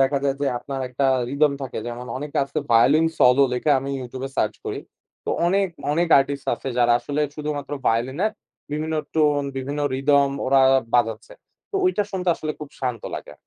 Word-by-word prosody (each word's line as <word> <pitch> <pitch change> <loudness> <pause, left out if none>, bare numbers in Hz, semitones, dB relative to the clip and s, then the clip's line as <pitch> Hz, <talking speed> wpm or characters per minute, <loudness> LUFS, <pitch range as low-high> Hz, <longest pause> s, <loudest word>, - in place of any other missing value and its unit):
দেখা 135 +1 +3
যায় 135 -1 +1
যে 145 - 0
আপনার 135 +1 -6
একটা 125 +2 -2 0.3
রিদম 145 +1 +3
থাকে। 130 - -5
যেমন 120 +1 -6
অনেক 145 +1 -7
আছে 140 +3 -3
ভায়োলিন 140 +8 +5
সলো 125 +2 +6
লিখে 125 +4 0
আমি 135 +1 -4
YouTube 130 +1 -6
এ - - -17
সার্চ - - +1
করি। - - -3 0.5
তো - - -7 0.2
অনেক, 195 +2 +2 0.3
অনেক 170 +2 +1
আর্টিস্ট 140 0 -2
আছে, 135 - -7
যারা 120 -1 +4
আসলে 145 +1 -3
শুধুমাত্র 150 -2 -4
ভায়োলিনের 130 - +1 0.4
বিভিন্ন 155 +1 -2 0.2
টোন, 150 -2 +3
বিভিন্ন 140 +3 -3
রিদম 140 +1 +3 0.2
ওরা 135 +1 +4 0.3
বাজাচ্ছে। 115 -2 +1 0.4
তো - - -12
ঐটা 290 - +2
শুনতে 185 -2 -2
আসলে 155 -1 -4
খুব 150 - -7
শান্ত 125 -4 -2
লাগে। - - -7
140 Hz, 180 wpm, -23 LUFS, 130-150 Hz, 0.5 s, সলো